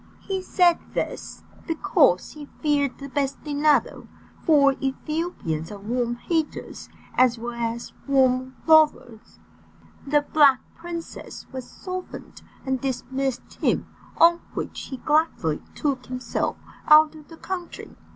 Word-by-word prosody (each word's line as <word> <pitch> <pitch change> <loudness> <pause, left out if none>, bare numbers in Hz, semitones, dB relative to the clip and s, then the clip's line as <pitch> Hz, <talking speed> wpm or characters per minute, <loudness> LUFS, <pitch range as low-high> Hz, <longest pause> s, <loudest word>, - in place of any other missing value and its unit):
He 385 -1 -3
said 355 -2 +3 0.2
this, - - -4 0.2
because 320 - +2
he 295 -2 -10
feared 290 -3 +1
the 275 - -8
bastinado, 285 +2 0 0.4
for 280 -4 +5
Ethiopians 270 - -3
are 205 - -7
warm 240 +4 -2
haters 320 +5 -3 0.2
as 250 -1 +4
well 240 +1 -5
as 235 0 -4
warm 260 -1 +2
lovers. 305 -8 +3 0.7
The 295 +1 +3
Black 280 -4 +6
Princess 335 0 -8
was 260 -2 -7
softened, 370 -1 -8 0.2
and 265 -2 -1
dismissed 265 0 -3
him, - - +1 0.3
on 340 +1 +6 0.2
which - - -4
he 265 - -6
gladly 295 - +1
took 270 -4 -2
himself 255 0 -2 0.3
out 305 0 +7
of 305 -2 -14
the 325 - -13
country. 360 -1 -6
280 Hz, 120 wpm, -24 LUFS, 255-315 Hz, 0.7 s, out